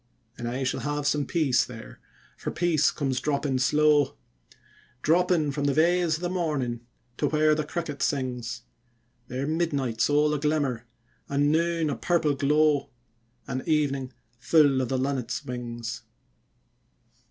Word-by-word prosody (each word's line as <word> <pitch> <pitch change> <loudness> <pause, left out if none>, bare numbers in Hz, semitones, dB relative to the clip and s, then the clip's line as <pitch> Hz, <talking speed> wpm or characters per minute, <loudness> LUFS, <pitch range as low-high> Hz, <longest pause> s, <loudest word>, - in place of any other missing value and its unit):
And 120 - -5
I 125 +3 -2
shall 130 - -1
have 145 0 -3
some 145 -1 +1
peace 140 -9 +2
there, 115 -3 -10 0.4
for - - -5
peace 170 -4 +2
comes 135 -3 -2
dropping 140 -2 -1
slow, 150 +2 +3 0.9
Dropping 170 -2 +2
from 145 0 -2
the 140 - +1
veils 170 +1 +3
of 160 - -7
the 175 - -1
morning 150 -10 -1 0.4
to - - +1
where 155 0 +3
the 155 0 0
cricket 150 -3 -5
sings; 125 -4 -2 0.6
There 130 +2 -3
midnight's 145 -8 0
all 150 +1 +3
a 150 - -1
glimmer, 140 -6 -1 0.4
and 145 +1 +2
noon 165 -1 +1
a - - -2
purple 155 +3 +1
glow, 145 0 +2 0.6
And 130 +1 -3
evening 140 -4 0 0.3
full 140 -1 +4
of 125 - -2
the 130 - 0
linnets' 130 -2 -2
wings. 120 -1 -5
145 Hz, 140 wpm, -26 LUFS, 130-155 Hz, 0.9 s, full